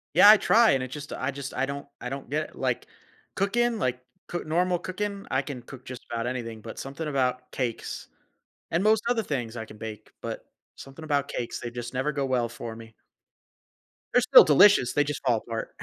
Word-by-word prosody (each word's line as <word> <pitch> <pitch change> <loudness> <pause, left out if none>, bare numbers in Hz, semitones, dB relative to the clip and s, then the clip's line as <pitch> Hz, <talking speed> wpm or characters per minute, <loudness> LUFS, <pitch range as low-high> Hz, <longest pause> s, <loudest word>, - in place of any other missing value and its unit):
Yeah, 205 - +9
I 215 - +10
try, 230 +2 +5
and 130 -1 +1
it 130 - -5
just 145 0 -7
I 130 +2 -2
just 140 0 -7
I 130 - +1
don't 140 +1 -6
I 125 - -5
don't 135 -2 -6
get 155 +2 -2
it, - - -18
like, - - -1 0.5
cooking, 235 +4 +1
like 125 -6 0 0.3
coo 175 - -4
normal 175 +3 +1
cooking, 200 +3 -4
I 130 - +2
can 130 -3 -7
cook 130 0 -12
just 125 -1 -9
about 115 0 -2
anything, 115 -3 -4
but 115 - -9
something 140 +4 -5
about 125 -3 -1
cakes, 120 -4 -4 0.6
and 170 +3 +2
most 215 +1 +3
other 240 -2 +2
things 125 - -3
I 115 - -4
can 105 -1 -13
bake, 110 -1 -8
but - - -5 0.3
something 135 +4 -11
about 145 -2 0
cakes, 120 - -4
they 120 - -5
just 120 +1 -6
never 130 +4 0
go 140 -2 -1
well 125 -3 +1
for 115 -1 -7
me. 115 0 -12 1.2
They're 250 - +5
still 255 +2 +9
delicious, 155 -3 +6
they 145 - +3
just 145 0 -4
fall 120 -3 +3
apart. 115 +1 -5
135 Hz, 210 wpm, -27 LUFS, 120-170 Hz, 1.2 s, I